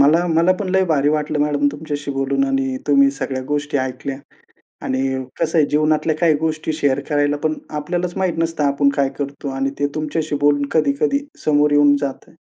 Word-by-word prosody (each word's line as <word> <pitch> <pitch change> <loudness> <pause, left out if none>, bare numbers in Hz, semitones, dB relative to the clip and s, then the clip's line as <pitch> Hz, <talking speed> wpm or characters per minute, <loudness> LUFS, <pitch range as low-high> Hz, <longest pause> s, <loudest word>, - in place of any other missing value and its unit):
मला 160 +5 +4
मला 165 +2 +3
पण 195 - -2
लय 190 0 +4
भारी 145 -4 +2
वाटलं 150 0 0
मॅडम 145 -1 +1
तुमच्याशी 145 -1 -5
बोलून 135 0 0
आणि 135 -1 -1
तुम्ही 140 -1 +5
सगळ्या 135 -2 -4
गोष्टी 145 0 -1
ऐकल्या 130 +1 -4 0.7
आणि 130 0 0 0.4
कसं 165 0 +1
आहे 150 - +4
जीवनातल्या 155 +1 +2
काही 160 -1 +3
गोष्टी 160 0 -1
शेअर 140 -1 +2
करायला 145 -1 +1
पण 155 - +1 0.2
आपल्यालाच 175 +3 -3
माहित 185 -3 -1
नसतं 165 -2 0
आपण 140 0 +2
काय 140 -1 +2
करतो 140 0 -5
आणि 135 +1 -1
ते 145 - +1
तुमच्याशी 155 0 -2
बोलून 145 0 +3
कधी-कधी 150 - +2 0.3
समोर 150 -1 +3
येऊन 145 -1 +5
जातं. 140 +2 -5
145 Hz, 180 wpm, -20 LUFS, 140-155 Hz, 0.7 s, तुम्ही